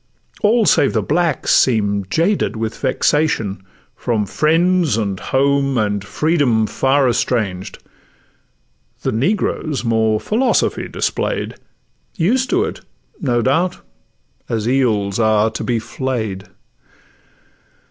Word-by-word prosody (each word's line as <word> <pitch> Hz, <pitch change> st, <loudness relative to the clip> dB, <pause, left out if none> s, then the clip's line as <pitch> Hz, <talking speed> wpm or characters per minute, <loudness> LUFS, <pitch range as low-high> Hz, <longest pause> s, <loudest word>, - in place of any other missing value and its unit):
All 220 Hz, +1 st, +3 dB
save 140 Hz, -, +3 dB
the -, -, 0 dB
blacks 165 Hz, -1 st, 0 dB
seem'd 100 Hz, -5 st, +2 dB
jaded 170 Hz, -, +1 dB
with 110 Hz, 0 st, -3 dB
vexation, 115 Hz, -11 st, 0 dB, 0.3 s
From 110 Hz, -3 st, -1 dB
friends, 165 Hz, -, +2 dB
and 100 Hz, -4 st, -2 dB
home, 140 Hz, 0 st, +1 dB
and 105 Hz, -2 st, 0 dB
freedom 140 Hz, -4 st, +1 dB
far 135 Hz, +4 st, +1 dB
estranged; 105 Hz, -6 st, -1 dB, 1.3 s
The -, -, 0 dB
negroes 150 Hz, -, -1 dB
more 110 Hz, -2 st, +1 dB
philosophy 235 Hz, -, 0 dB
display'd,— -, -, -2 dB, 0.6 s
Used 250 Hz, +9 st, +1 dB
to 370 Hz, +3 st, +2 dB
it, -, -, -5 dB, 0.4 s
no 120 Hz, -7 st, 0 dB
doubt, 170 Hz, +9 st, +1 dB, 0.7 s
as 110 Hz, -1 st, -2 dB
eels 110 Hz, -6 st, +1 dB
are 110 Hz, 0 st, +3 dB
to -, -, -5 dB
be 120 Hz, -2 st, 0 dB
flay'd. 110 Hz, -5 st, -4 dB
125 Hz, 105 wpm, -18 LUFS, 110-155 Hz, 1.3 s, All